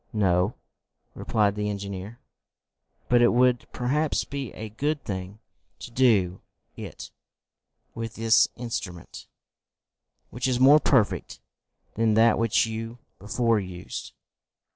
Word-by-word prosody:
"No," 95 0 +1 0.6
replied 105 -3 0
the 105 0 -2
engineer 100 +2 -6 0.9
"But 120 -1 +4
it 120 - +6
would 125 0 +2
perhaps 145 +5 0
be 140 -3 -6
a 110 0 -7
good 145 +6 -2
thing 95 +1 -5 0.4
to - - -10
do 105 -8 +2 0.3
it - - -9 0.8
with 115 -1 -6
this 115 0 +4
instrument, 105 -8 -6 1.0
which 120 +3 -2
is 125 -1 0
more 140 +4 +7
perfect 125 -9 +1 0.5
than 110 -1 +1
that 115 0 +4
which 115 +1 +2
you 115 +1 -6 0.2
before 115 +2 +1
used." 90 -2 -7
115 Hz, 115 wpm, -26 LUFS, 100-125 Hz, 1.0 s, more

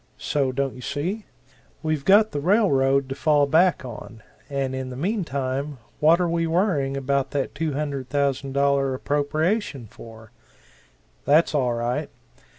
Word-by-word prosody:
So, 140 -3 0
don't 135 0 -2
you 125 - -11
see? 165 - -3 0.6
We've 155 -3 -1
got 205 +6 +5
the 145 - -2
rail 200 +7 +3
road 135 0 +2
to - - -2
fall 145 0 +3
back 165 +1 +3
on; 115 -2 -10 0.3
and 135 -2 -2
in 130 -1 -4
the 125 - -7
meantime, 140 - -2 0.2
what 160 +3 +5
are 180 - +1
we 165 0 0
worrying 160 -6 +1
about 135 0 0
that 135 - -2
$200,000 140 -2 0
appropriation 150 - -1
for? 110 +1 -13 0.9
That's 155 +4 +4
all 125 -5 +1
right. 120 +1 -2
140 Hz, 140 wpm, -24 LUFS, 135-160 Hz, 0.9 s, got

